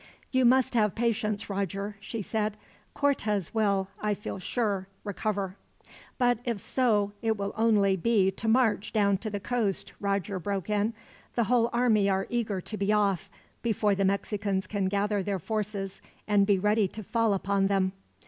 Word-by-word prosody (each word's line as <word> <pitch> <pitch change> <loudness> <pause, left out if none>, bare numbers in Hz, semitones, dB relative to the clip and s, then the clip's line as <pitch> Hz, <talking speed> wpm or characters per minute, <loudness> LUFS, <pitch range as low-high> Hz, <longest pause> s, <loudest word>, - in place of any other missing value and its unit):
"You 260 -1 +3
must 255 +1 +4
have 210 -4 +2
patience, 220 -3 0
Roger," 200 +1 -3
she 210 +1 -5
said. 215 0 -1 0.4
"Cortez 215 - 0
will, 200 -4 +2
I 210 -1 +1
feel 200 - -6
sure, 200 -1 -1 0.2
recover." 200 -1 -2 0.6
"But 245 -3 +3
if 235 -5 -2
so, 210 -4 +1
it 225 -2 +1
will 200 0 -3
only 210 -3 +3
be 195 0 +2
to 225 - -5
march 220 -3 +2
down 200 -3 +3
to 215 - -4
the 205 -1 -3
coast," 215 -2 -1
Roger 200 -1 -1
broke 200 +2 -3
in. 210 +2 +1 0.4
"The 235 - +3
whole 235 +1 +3
army 225 -5 +3
are 190 0 +1
eager 220 -5 -1
to 215 - -6
be 200 +1 +1
off, 200 -4 +1 0.3
before 215 -3 +1
the 195 0 0
Mexicans 200 0 0
can 200 -2 -2
gather 205 +1 +1
their 195 +1 -1
forces 200 0 -3 0.3
and 205 -2 +4
be 200 -2 +4
ready 210 +1 +2
to 215 +3 -8
fall 225 0 +1
upon 195 0 +1
them." 195 -1 +1
205 Hz, 165 wpm, -28 LUFS, 195-220 Hz, 0.6 s, must